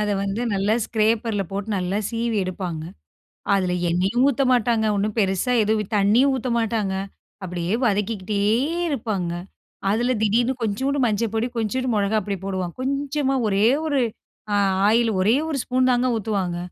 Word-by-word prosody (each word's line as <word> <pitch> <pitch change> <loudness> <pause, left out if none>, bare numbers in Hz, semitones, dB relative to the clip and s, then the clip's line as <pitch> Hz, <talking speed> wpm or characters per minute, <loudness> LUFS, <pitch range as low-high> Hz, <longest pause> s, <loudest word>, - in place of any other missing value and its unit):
அத 210 - 0
வந்து 200 +4 -2
நல்லா 200 +3 +1
ஸ்க்ரேப்பர்ல 220 -2 +1
போட்டு, 200 +2 -4
நல்லா 185 +3 -1
சீவி 230 -1 -1
எடுப்பாங்க. 175 -4 -4 0.7
அதுல 185 -2 +1 0.2
எண்ணெயும் 190 +9 +1
ஊத்த 275 +1 +1
மாட்டாங்க, 230 -2 +2
ஒன்னும் 210 +2 -1
பெருசா 195 +5 +1
எதுவும், 215 0 -1
தண்ணியும் 235 +8 +4
ஊத்த 255 0 -3
மாட்டாங்க. 215 -4 -1 0.5
அப்டியே 175 +2 -3
வதக்கிக்கிட்டே 205 -1 -1 0.5
இருப்பாங்க. 210 - -2 0.6
அதுல 240 +4 +1
திடீர்னு 235 +5 +2
கொஞ்சூண்டு 265 +7 -1
மஞ்சப்பொடி, 225 +1 0
கொஞ்சூண்டு 250 +4 -1
மொளகாய் 205 0 +1
பொடி 200 -1 -2
போடுவாங்க. 185 -3 -3
கொஞ்சமா 275 0 -1
ஒரே 200 +2 +3 0.2
ஒரு 285 -3 +1 0.5
அ - - +3 0.3
ஆயில் 230 +1 +3
ஒரே 220 +6 +4
ஒரு 290 - -1
ஸ்பூன் 255 0 +1
தாங்க 245 +1 +2
ஊத்துவாங்க. 195 -5 -2
215 Hz, 140 wpm, -23 LUFS, 195-240 Hz, 0.7 s, தண்ணியும்